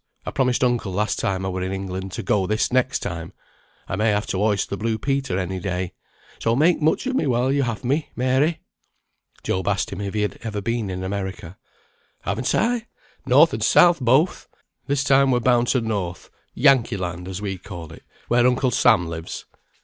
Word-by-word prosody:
I - - -3
promised 125 -2 +1
uncle 120 -5 +1
last 105 +4 -1
time 95 -1 -1
I - - -1
were 95 0 -3
in 95 +1 -2
England 95 0 -4
to - - -4
go 95 -3 +1
this 110 +4 0
next 130 0 +1
time. 85 -1 -5 0.5
I - - -2
may 110 +3 +2
have 105 0 +1
to 95 - -1
hoist 105 -1 +1
the - - 0
blue 110 +2 -1
Peter 135 -4 -1
any 95 0 -3
day; 90 -1 -3 0.5
so, 115 0 +1
make 160 +5 +3
much 155 - +2
of 260 - -1
me 205 - +1
while 125 +1 +1
you 140 0 +2
have 115 -5 -2
me, 140 +5 0
Mary." 130 +6 +1 0.8
Job 95 0 -2
asked 100 -2 0
him 100 0 -5
if 100 0 -4
he 105 - +1
had 105 - -3
ever 110 -3 -4
been 115 0 -2
in 95 0 -4
America. 95 -2 -5 0.7
"Haven't 110 +6 -1
I? 235 0 0 0.4
North - - +6
and - - -3
South 175 -2 +5
both! 135 +7 +2 0.4
This 140 -1 +1
time 135 -1 +4
we're 125 -2 +3
bound 120 0 +3
to 130 - +2
North. 100 -6 -4 0.2
Yankee 130 -5 +4
Land, 90 -1 -5
as 95 0 -5
we 95 -3 -4
call 85 -5 -9
it, - - -13 0.3
where 120 +1 +4
Uncle 125 0 +1
Sam 110 -9 +4
lives." 80 0 -6
110 Hz, 200 wpm, -23 LUFS, 95-130 Hz, 0.8 s, North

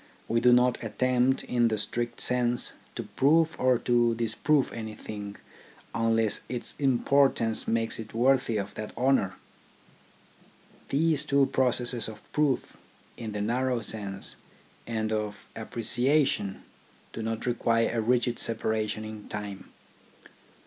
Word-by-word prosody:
We 115 - +2
do 125 +1 +5
not 125 0 +3
attempt, 125 +3 +1
in 120 -1 +2
the 110 -1 0
strict 120 +4 -2
sense, 125 -1 +2 0.2
to - - -4
prove 160 +4 +2
or 130 -1 +4
to 120 -1 +2
disprove 120 +5 +1
anything, 105 -2 -7 0.6
unless 115 -1 +1
its 125 -1 -4
importance 135 -3 +2
makes 115 0 0
it 110 -1 -7
worthy 125 -2 +2
of 100 -1 -4
that 105 +1 -7
honour. 125 -7 +2 1.5
These 155 +1 +2
two 140 0 +3
processes 125 -3 0
of 110 -1 -10
proof, 150 -4 0 0.4
in 110 -3 -6
the 105 - -3
narrow 125 +3 0
sense, 100 -2 -1 0.5
and 110 -1 -2
of 105 -1 -3
appreciation 120 -3 0 0.5
do - - -5
not 110 0 -3
require 115 -1 +1
a 115 - +1
rigid 120 +1 +1
separation 110 -1 -1
in 110 -1 -9
time. 100 -2 -6
115 Hz, 125 wpm, -28 LUFS, 110-125 Hz, 1.5 s, do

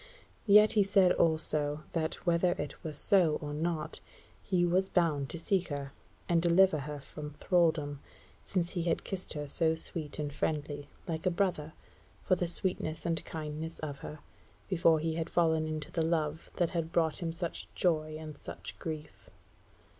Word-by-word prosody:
Yet 210 +1 +8
he 215 - +4
said 195 -2 +5
also, 155 -2 +1
that, 160 -1 -1
whether 175 +1 +3
it 140 - -6
were 160 - -3
so 170 0 +3
or 145 0 -5
not, 160 0 -2 0.4
he 180 -2 +2
was 185 +2 +2
bound 155 -6 +1
to - - -3
seek 185 +2 0
her, 140 -2 -5 0.3
and 170 -1 +3
deliver 175 -1 +5
her 145 +1 -5
from 150 +1 -8
thralldom, 160 -4 +1 0.4
since 175 -3 -1
he 175 - -2
had 165 -1 0
kissed 190 -2 -3
her 150 -1 -4
so 160 +2 +2
sweet 160 -2 -3
and 145 -1 -3
friendly, 145 -1 -2 0.2
like 165 +2 -2
a - - +6
brother, 170 -4 -1 0.5
for - - +2
the 175 -1 -1
sweetness 170 -2 -1
and 165 -2 0
kindness 155 +1 -5
of 145 -3 -5
her, 150 - -7 0.5
before 170 -3 +4
he 160 +1 -1
had 165 0 -2
fallen 160 -2 +2
into 155 -1 -4
the 165 - 0
love 160 -1 -1
that 175 -2 +1
had 165 -2 -2
brought 165 -2 +1
him 165 -1 -1
such 170 0 -4
joy 155 -3 +1
and 155 -2 -8
such - - -8
grief. 155 -2 -7
160 Hz, 170 wpm, -31 LUFS, 150-175 Hz, 0.5 s, Yet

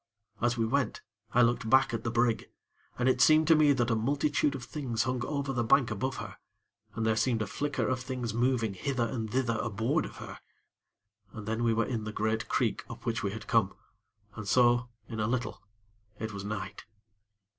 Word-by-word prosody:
As 120 0 +1
we 115 - +1
went 130 0 0 0.3
I 125 - +5
looked 115 -1 +1
back 130 0 +4
at 115 -1 -2
the 115 - -1
brig, 120 0 +1 0.5
and 125 - +1
it 130 -1 +3
seemed 155 +3 +6
to 165 - +8
me 150 -1 +5
that 125 -3 +1
a - - +3
multitude 145 +4 +1
of 130 - -6
things 125 -2 -2
hung 130 -1 -1
over 140 -1 -2
the 120 -2 0
bank 120 +1 +4
above 130 +6 -2
her, - - -7 0.6
and 110 - -1
there 110 -1 +2
seemed 110 0 +1
a - - -3
flicker 145 +5 -2
of 130 -1 0
things 125 -3 -4
moving 120 -3 +1
hither 125 +4 -1
and 110 -3 -4
thither 120 -3 0
aboard 120 +8 0
of - - -9
her. - - -8 0.9
And 110 -1 -8
then 110 +2 -1
we 115 -1 +2
were 115 - +2
in 115 -4 -3
the 110 - -4
great 110 +1 -1
creek - - 0
up - - -9
which - - -1
we - - -1
had - - -7
come, - - +2 0.6
and 110 -3 -7
so, 120 +2 +4 0.2
in 110 - -6
a 105 - +1
little, 120 -2 -2 0.6
it 110 0 -5
was 100 -1 -6
night. 100 -1 -5
120 Hz, 205 wpm, -30 LUFS, 110-130 Hz, 0.9 s, to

